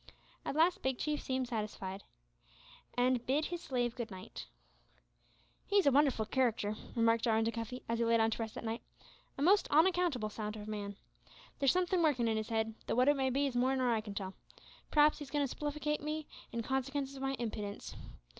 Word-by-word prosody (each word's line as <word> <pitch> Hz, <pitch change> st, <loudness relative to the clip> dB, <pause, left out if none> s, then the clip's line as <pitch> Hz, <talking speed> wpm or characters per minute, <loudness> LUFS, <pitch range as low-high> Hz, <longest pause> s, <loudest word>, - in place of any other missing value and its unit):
At -, -, -2 dB
last 335 Hz, +3 st, +3 dB
Big 265 Hz, -1 st, 0 dB
Chief 300 Hz, -1 st, -1 dB
seemed 260 Hz, -1 st, -1 dB
satisfied, 210 Hz, -4 st, -4 dB, 0.9 s
and 250 Hz, -1 st, +3 dB
bade 290 Hz, +4 st, +2 dB
his 350 Hz, -1 st, -4 dB
slave 245 Hz, -5 st, -1 dB
good 235 Hz, -2 st, -4 dB
night. 185 Hz, -2 st, -8 dB, 1.2 s
"He's 400 Hz, -2 st, +4 dB
a 280 Hz, -, +6 dB
wonderful 270 Hz, -5 st, +3 dB
c'racter," 225 Hz, -4 st, +1 dB, 0.2 s
remarked 230 Hz, -1 st, +3 dB
Jarwin 225 Hz, -1 st, +3 dB
to 230 Hz, -, +1 dB
Cuffy, 230 Hz, +2 st, -5 dB
as 230 Hz, 0 st, -1 dB
he 235 Hz, -, +2 dB
lay 230 Hz, 0 st, +4 dB
down 225 Hz, 0 st, +3 dB
to -, -, -2 dB
rest 225 Hz, -1 st, -4 dB
that -, -, -6 dB
night, 225 Hz, +1 st, -3 dB, 0.6 s
"a 275 Hz, -, -1 dB
most 400 Hz, +5 st, +5 dB
onaccountable 325 Hz, -, +3 dB
sort 210 Hz, 0 st, -4 dB
o' 210 Hz, -, -7 dB
man. 205 Hz, -1 st, -4 dB, 0.6 s
There's 275 Hz, -2 st, +5 dB
sumthin' 365 Hz, 0 st, +2 dB
workin' 270 Hz, -8 st, +3 dB
in 220 Hz, -1 st, +1 dB
'is 220 Hz, +2 st, -5 dB
'ead; 225 Hz, 0 st, 0 dB
tho' -, -, 0 dB
wot 255 Hz, +3 st, +5 dB
it 290 Hz, -, +5 dB
may 265 Hz, -1 st, +1 dB
be 275 Hz, +3 st, +1 dB
is 270 Hz, -3 st, -2 dB
more 255 Hz, +2 st, +3 dB
nor 255 Hz, -2 st, +2 dB
I 220 Hz, -, +1 dB
can 205 Hz, -2 st, -8 dB
tell. 190 Hz, -2 st, -4 dB, 0.6 s
P'raps 300 Hz, 0 st, +5 dB
he's 290 Hz, -2 st, -7 dB
agoin' 290 Hz, -1 st, +1 dB
to -, -, -7 dB
spiflicate 300 Hz, 0 st, -2 dB
me, 305 Hz, +1 st, -3 dB, 0.3 s
in 230 Hz, 0 st, -2 dB
consikence 270 Hz, +2 st, -2 dB
o' -, -, -8 dB
my 270 Hz, 0 st, -1 dB
impidence. 210 Hz, -4 st, -5 dB
250 Hz, 200 wpm, -34 LUFS, 225-290 Hz, 1.2 s, a